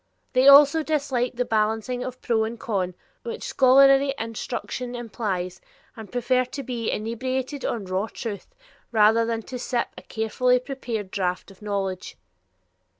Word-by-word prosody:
They 255 +1 +4
also 285 +3 +8
dislike 275 -6 -1
the 250 +1 0
balancing 225 +2 0
of 255 0 -7
pro 225 -3 +2
and 225 +1 -4
con 185 -5 -2 0.3
which 465 0 -6
scholarly 275 +1 +5
instruction 240 +2 -4
implies, 195 -6 -4 0.3
and 220 -3 -10
prefer 250 +1 +1
to 275 +2 -7
be 235 -3 -3
"inebriated 255 +5 -3
on 220 -4 -2
raw 190 +3 -1
truth" 210 -4 -7 0.4
rather 225 +1 +4
than 225 -1 -2
to 250 +2 -7
sip 240 -1 -1
a - - -10
carefully 250 +3 +1
prepared 245 -6 -5
draught 180 0 -2
of 195 - -19
knowledge. 195 -3 -3
235 Hz, 145 wpm, -24 LUFS, 215-255 Hz, 0.4 s, also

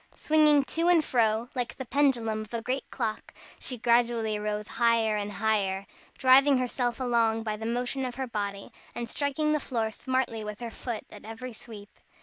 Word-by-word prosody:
Swinging 300 -2 +4
to 330 +5 -1
and 340 -3 +5
fro 225 -1 +2
like 250 -3 -3
the 260 - -5
pendulum 235 -6 +1
of 215 +1 -10
a 230 - -2
great 260 +3 -3
clock, 225 -4 -4 0.2
she 255 - -2
gradually 235 -2 +2
rose 210 0 -3
higher 230 -2 +2
and 205 0 -3
higher, 200 -2 0 0.3
driving 265 +1 +6
herself 250 -1 -1
along 230 -3 +2
by 215 -1 -2
the 220 +1 -5
motion 245 +3 -1
of 250 -1 -4
her 265 +1 -2
body, 200 -4 -4 0.2
and 235 - -4
striking 290 +3 -1
the 305 - +2
floor 230 -5 -2
smartly 255 -1 -2
with 210 0 -6
her 235 -1 -5
foot, 235 -1 -5
at - - -12
every 225 +3 -7
sweep. 210 -2 -11
235 Hz, 180 wpm, -28 LUFS, 220-260 Hz, 0.3 s, driving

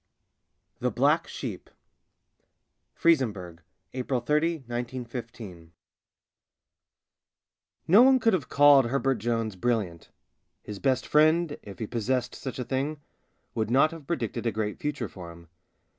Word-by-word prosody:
THE - - 0
BLACK - - +2
SHEEP - - -7 1.3
FRIZENBURG, 105 - +1 0.3
APRIL 130 0 -2
30, 150 +5 0
I915 120 -7 -7 2.2
No 195 +8 +7
one 260 +1 +6
could 225 -1 +2
have 165 -8 -1
called 145 -2 +6
Herbert 135 -1 0
Jones 115 -2 -2
brilliant: 100 -6 -2 0.5
his 105 -1 -8
best 135 -2 +1
friend 155 +1 +3
— - - -42
if 100 -2 -11
he 110 - -4
possessed 120 +3 -2
such 130 - -7
a 125 - -3
thing 140 +4 -2 0.3
— - - -46
would 110 -2 -2
not 135 +5 +4
have 160 -4 -11
predicted 120 - -2
a - - +1
great 105 0 -3
future 145 -6 -3
for 90 -3 -10
him. 85 -1 -15
125 Hz, 130 wpm, -27 LUFS, 110-145 Hz, 2.2 s, No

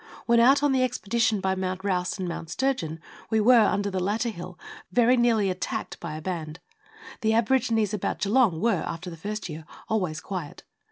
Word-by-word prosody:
When 235 0 +4
out 270 +5 +5
on 290 - +3
the 260 -1 +2
expedition 225 -3 0
by 190 0 +1
Mount 185 0 -3
Rouse 185 -2 -1
and 185 -2 -3
Mount 165 -1 -5
Sturgeon 210 - -1 0.3
we 220 - +2
were, 235 +2 +6
under 200 0 0
the 190 - -1
latter 210 +6 0
hill, 180 -3 -8 0.3
very 240 +5 +4
nearly 230 -5 +2
attacked 180 - -4
by 155 - -6
a 155 - -6
band. 165 -3 -4 0.6
The 220 -1 +2
aborigines 225 -3 +2
about 210 - -2
Geelong 210 -5 +2
were, 230 +3 +1
after 170 +2 -5
the - - -7
first 210 +6 -5
year, 160 -1 -7 0.3
always 180 -9 -1
quiet. 175 -3 -6
205 Hz, 185 wpm, -26 LUFS, 180-235 Hz, 0.6 s, were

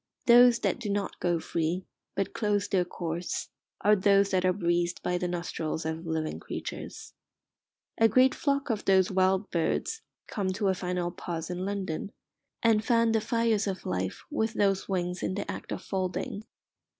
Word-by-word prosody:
Those 240 0 +8
that - - 0
do 225 -4 -4
not 200 0 -2
go 175 -1 +1
free, 170 +3 -2 0.3
but 195 - -1
close 210 -2 0
their 185 -2 +2
course, 175 -1 -4 0.3
are 210 +1 +5
those 200 0 +4
that 185 -1 +2
are 185 - +4
breathed 175 -2 0
by 180 0 0
the 180 - -1
nostrils 170 -2 -3
of 160 +1 -4
living 160 -1 -2
creatures. - - -7 0.9
A 225 - +7
great 255 +4 +5
flock 280 -2 0
of 215 -2 -3
those 190 -1 +4
wild 190 +1 +2
birds 315 - -1 0.2
come 200 -3 -3
to 200 0 0
a - - +3
final 180 -1 -2
pause 170 -2 -5
in 180 +1 -3
London, 195 -2 -3 0.5
and 220 -2 +4
fan 230 -1 +3
the 220 -1 +2
fires 225 -2 +1
of 190 -2 -4
life 95 0 -2
with 220 0 0
those 195 -1 +1
wings 180 -1 -1
in 185 - -1
the 205 - -3
act - - -8
of - - -4
folding. 190 +2 -3
190 Hz, 175 wpm, -29 LUFS, 175-210 Hz, 0.9 s, Those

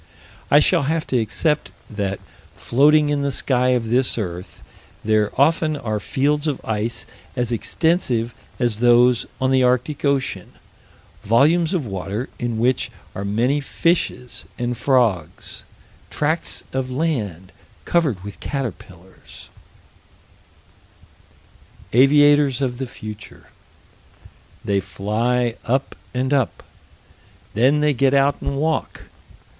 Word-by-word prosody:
I 145 - +7
shall 150 - +3
have 160 -1 0
to 125 - +4
accept 150 +7 0 0.2
that, 100 -2 -3 0.4
floating 150 +4 +3
in 145 -1 0
the 140 0 0
sky 125 -1 +1
of 120 -3 +1
this 125 0 +2
earth, 90 -4 -6 0.4
there 110 -1 +2
often 155 +1 +3
are 110 -6 -3
fields 145 +6 0
of 145 - -1
ice 110 +1 -2 0.3
as 120 -1 -1
extensive 120 - 0 0.2
as 120 -4 0
those 120 0 +4
on 130 0 +1
the 130 -1 +4
Arctic 125 +4 +1
Ocean 135 -10 -1 0.7
volumes 155 - +3
of 160 -7 -1
water 100 +4 -4
in 120 -2 -2
which 125 +2 +1 0.2
are 100 - -5
many 120 +8 +1
fishes 145 -4 -1
and 120 0 -2
frogs 115 - 0 0.4
tracts 155 +3 -1
of 130 -1 -2
land 115 - -2 0.3
covered 145 - +1
with 100 0 -9
caterpillars 95 - -7 2.4
Aviators 145 +1 +5
of 125 -3 -2
the 130 - -3
future. 105 -3 -10 1.2
They 100 -1 +1
fly 110 +6 -1
up 130 +4 -1 0.2
and 130 +2 -1
up. 135 -5 0 0.9
Then 135 +7 +3
they 150 -1 +3
get 135 +2 +2
out 140 +1 +2
and 140 - -3
walk. 160 +3 -2
125 Hz, 120 wpm, -21 LUFS, 110-145 Hz, 2.4 s, I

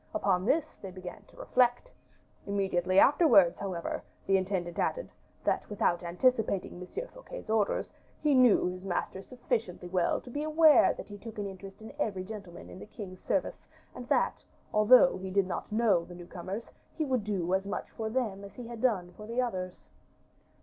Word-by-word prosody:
Upon 190 -11 +1
this 310 +2 +1
they 195 - -6
began 185 +1 -9
to - - -21
reflect. 250 - +1 0.6
Immediately 190 -2 0
afterwards, 200 - +6
however, 185 -4 -3 0.2
the 195 - +3
intendant 185 -2 -1
added, - - -1 0.3
that - - 0
without 180 -4 +1
anticipating 190 0 0
M. 440 - -6
Fouquet's - - -9
orders, 220 -2 0 0.3
he 300 -2 +2
knew 255 -4 +5
his 180 +1 -4
master 190 0 -3
sufficiently 225 -6 -3
well 180 -1 +1
to 245 - -12
be 290 - -3
aware 310 0 +5
that - - -8
he 205 0 -9
took 225 +1 -9
an 205 - -2
interest 195 +1 -9
in 220 - -9
every 195 -9 -1
gentleman 200 -3 -9
in - - -10
the - - -10
king's 195 -4 -9
service, - - -2 0.3
and - - -9
that, - - +1 0.3
although 215 0 +6
he 190 0 -5
did 195 0 +2
not 185 - -5
know 210 -6 +3
the 175 - -11
new 175 0 -10
comers, 185 +6 -6 0.2
he 315 - -1
would 255 -5 0
do 190 -4 -1
as 190 +1 0
much - - -4
for 220 -1 -4
them 220 -5 -2
as 200 - -11
he 245 - -8
had 230 -1 -8
done 190 -9 +1
for 210 - -10
the 235 +2 -2
others." 185 - -3
200 Hz, 185 wpm, -30 LUFS, 185-245 Hz, 0.6 s, afterwards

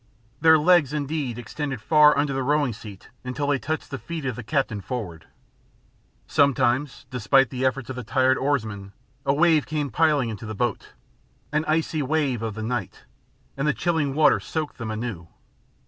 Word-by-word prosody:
Their 160 +1 +6
legs 155 -3 +4
indeed 145 -4 -2
extended 135 +2 -5
far 150 +6 +5
under 145 -1 +1
the 135 - -1
rowing 145 -1 +1
seat 105 -3 -12
until 130 +3 -3
they 140 -2 +1
touched 155 +3 -4
the 135 - -4
feet 165 -4 -6
of 130 -3 -2
the 125 - -6
captain 120 -3 -1
forward. 95 -9 -6 1.0
Sometimes, 140 0 +1
despite 130 +1 +3
the 130 0 -3
efforts 130 -1 0
of 130 - -6
the 125 - -5
tired 130 +3 +2
oarsman, 110 -8 -2 0.3
a 135 - +4
wave 160 -1 +3
came 150 -3 -2
piling 150 -4 +2
into 110 -1 -7
the 110 - -5
boat, 120 +1 -2 0.6
an 150 +1 0
icy 155 0 0
wave 140 -4 0
of 110 -2 -4
the 110 - -5
night, 115 -3 -4 0.5
and 140 +2 -1
the 150 - +2
chilling 160 -5 0
water 155 0 +5
soaked 155 -4 -4
them 115 -2 -4
anew. 110 -6 -5
135 Hz, 175 wpm, -24 LUFS, 120-150 Hz, 1.0 s, Their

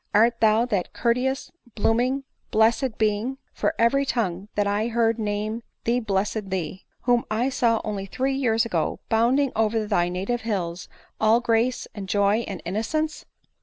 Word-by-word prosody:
Art 230 +2 +4
thou 220 +1 +4
that 200 -7 -2
courteous, 250 +3 0 0.2
blooming, 245 +5 +1 0.3
blessed 225 +2 +2
being, 220 +5 0 0.2
(for - - -1
every 255 +5 +3
tongue 205 -8 -1
that 205 - +2
I 205 +2 0
heard 230 -1 +1
name 215 +2 -2 0.2
thee 240 +2 +2
blessed 205 -1 -1
thee,) 185 -1 -4
whom 245 -1 +2
I 230 +5 +1
saw 235 -4 +2
only 200 -2 -4
three 265 +7 -1
years 230 -4 +2
ago 170 -9 -1
bounding 250 +5 +3
oVer 220 0 +1
thy 175 -5 +1
native 195 +7 -2
hills, 185 -6 -3 0.3
all 220 +2 +4
grace, 240 +1 +1
and 195 -3 -7
joy, 205 +1 +3
and 190 -3 -6
innocence 230 - -2
225 Hz, 155 wpm, -24 LUFS, 205-240 Hz, 0.3 s, Art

